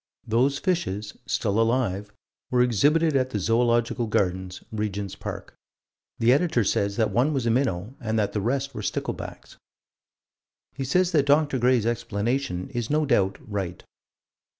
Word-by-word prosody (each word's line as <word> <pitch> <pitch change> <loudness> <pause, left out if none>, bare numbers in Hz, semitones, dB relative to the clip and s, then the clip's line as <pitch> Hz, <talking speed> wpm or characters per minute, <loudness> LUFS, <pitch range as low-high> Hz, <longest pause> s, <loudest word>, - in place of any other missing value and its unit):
Those 125 +5 +2
fishes 110 - -2
still 105 -1 0
alive 115 -4 0 0.4
were 125 -1 +3
exhibited 145 - +3
at 130 -1 +2
the 110 - -2
Zoological 120 +3 +1
Gardens, 95 -2 -1
Regent's 105 -3 -3
Park. - - -7 0.6
The 120 +2 +4
Editor 145 -5 +2
says 100 0 0
that 110 -2 +2
one 125 +9 +2
was 135 -4 -1
a 115 - +3
minnow 115 -4 0
and 110 -2 -1
that 105 -2 0
the 105 - -1
rest 135 +5 -1
were 110 - -5
sticklebacks. - - -5 1.2
He 135 0 -4
says 180 +7 +2
that 145 -4 +2
Dr. 145 -2 +3
Gray's 125 -2 +3
explanation 115 -2 -2
is 120 -3 -3
no 150 +1 +2
doubt 95 -8 +2
right. 95 -4 -4
120 Hz, 150 wpm, -25 LUFS, 105-135 Hz, 1.2 s, The